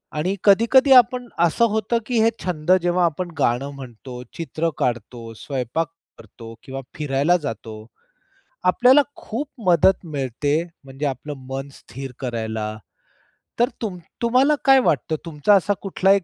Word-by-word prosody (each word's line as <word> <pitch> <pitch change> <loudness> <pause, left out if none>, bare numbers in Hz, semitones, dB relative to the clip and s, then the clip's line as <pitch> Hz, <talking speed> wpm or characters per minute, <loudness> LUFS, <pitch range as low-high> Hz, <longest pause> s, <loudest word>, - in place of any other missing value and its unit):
आणि 180 +6 -1
कधी-कधी 235 +7 +5
आपण 250 0 +5
असं 170 +7 +3
होतं, 220 +2 0
की 245 -3 0
हे 225 - +5
छंद 175 -1 -1
जेव्हा 175 0 +2
आपण 175 +2 -2
गाणं 135 0 0
म्हणतो, 125 -1 -9 0.2
चित्र 165 0 -2
काढतो, 120 -1 -3
स्वयंपाक 135 +6 -3 0.3
करतो 115 -1 -12
किंवा 135 0 -6
फिरायला 150 +3 +1
जातो, 110 -4 -5 0.9
आपल्याला 250 +10 +5
खूप 270 +6 -5 0.2
मदत 180 +2 +4
मिळते 145 -2 -2 0.3
म्हणजे 135 +2 -5
आपलं 140 +2 -4 0.2
मन 135 +1 -4
स्थिर 135 +1 -9
करायला. 110 -3 -3 0.9
तर 240 - +3
तुम 200 -5 -3 0.2
तुम्हाला 255 +5 +3
काय 270 -1 +7
वाटतं 155 - 0
तुमचा 160 +4 +2
असा 205 +2 +2
कुठला 195 0 +1
एक 195 -3 +1
160 Hz, 135 wpm, -22 LUFS, 135-205 Hz, 0.9 s, काय